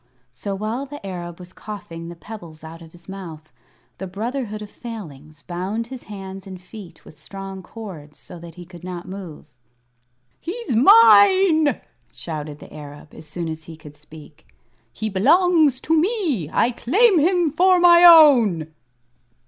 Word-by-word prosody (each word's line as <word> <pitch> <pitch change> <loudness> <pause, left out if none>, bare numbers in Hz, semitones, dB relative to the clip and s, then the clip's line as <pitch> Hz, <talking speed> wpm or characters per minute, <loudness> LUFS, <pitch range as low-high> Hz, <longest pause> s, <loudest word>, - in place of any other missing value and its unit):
So 195 +11 -5
while 220 +7 -4
the 290 -6 -10
Arab 175 -3 -7
was 180 0 -13
coughing 170 -6 -9
the 170 - -9
pebbles 170 -3 -12
out 165 +1 -11
of 165 -1 -14
his 175 0 -19
mouth, 165 -7 -10 0.5
the 190 - -5
Brotherhood 215 +2 -5
of 210 - -12
Failings 155 - -10
bound 190 +6 -4
his 255 - -10
hands 195 -2 -9
and 185 -1 -9
feet 180 -2 -13
with - - -15
strong 195 +3 -9
cords, 180 -8 -11
so 175 - -11
that 165 -1 -12
he 175 - -11
could 175 -1 -14
not 180 -1 -7
move. 185 -5 -9 0.9
"He's 430 - -5
mine!" 275 - +6 0.3
shouted 150 -3 -6
the - - -14
Arab, 145 0 -12
as 155 - -12
soon 165 +2 -5
as 160 -1 -6
he 165 - -10
could 155 -2 -14
speak. 150 +1 -16 0.4
"He 220 - -5
belongs 310 - +3
to 325 - +1
me. 320 - 0
I 240 - +2
claim 375 - +3
him 345 0 +2
for 365 +4 +3
my 345 0 +6
own." 240 - +6
195 Hz, 155 wpm, -21 LUFS, 165-260 Hz, 0.9 s, mine